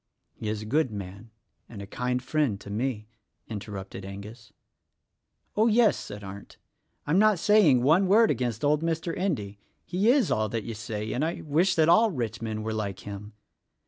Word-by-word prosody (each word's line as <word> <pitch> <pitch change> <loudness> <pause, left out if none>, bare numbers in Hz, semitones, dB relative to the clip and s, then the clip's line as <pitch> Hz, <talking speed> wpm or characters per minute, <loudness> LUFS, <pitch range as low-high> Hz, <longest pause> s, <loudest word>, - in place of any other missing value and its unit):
"He 110 - -5
is 110 0 -3
a - - -8
good 145 +4 +1
man, 100 +1 -8 0.4
and 110 - -9
a 100 - -6
kind 125 +4 -2
friend 135 -7 0
to 100 - -9
me," 110 -1 -2 0.4
inter 105 -1 -7
rupted 95 0 -7
Angus. 105 +3 -10 1.0
"Oh, 220 +2 +4
yes!" 225 -1 +4
said 105 0 -8
Arndt,'Tm 100 - -5
not 215 -2 +5
saying 170 - +4
one 170 +8 +4
word 220 +4 +5
against 120 -2 -2
old 150 +1 +3
Mr. 165 0 -2
Endy; 105 - -2 0.3
he 190 +6 +1
is 265 0 +3
all 110 0 +1
that 115 0 -3
you 115 - -5
say, 110 0 -4
and 130 - -1
I 165 +2 -2
wish 170 +5 +2
that 160 -1 +4
all 220 +7 +5
rich 120 - -4
men 110 -1 -3
were 110 0 -2
like 100 -3 -4
him. 105 +1 -8
120 Hz, 180 wpm, -27 LUFS, 105-165 Hz, 1.0 s, not